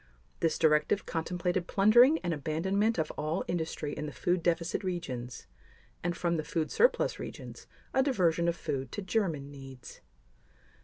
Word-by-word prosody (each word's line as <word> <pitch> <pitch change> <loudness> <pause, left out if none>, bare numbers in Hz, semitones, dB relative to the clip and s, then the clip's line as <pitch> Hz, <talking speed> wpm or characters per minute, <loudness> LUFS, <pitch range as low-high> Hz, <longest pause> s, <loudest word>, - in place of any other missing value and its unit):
This 165 - +1
directive 155 +4 +3
contemplated 175 +2 -2
plundering 240 +9 +6
and 175 - 0
abandonment 190 +9 0
of 155 -2 -1
all 155 +4 -1
industry 160 -3 -3
in 150 - -4
the - - -5
food 175 +4 0
deficit 170 +3 0
regions 130 -10 -4 0.6
and, 175 0 -1
from 170 -1 0
the 155 - -2
food 155 +1 -2
surplus - - +2
regions, - - -8 0.3
a 265 - +4
diversion 175 - +2
of 170 - +1
food 135 -6 -4
to 205 - -4
German 170 -9 -1
needs. 135 -3 -11
170 Hz, 150 wpm, -30 LUFS, 150-185 Hz, 0.6 s, plundering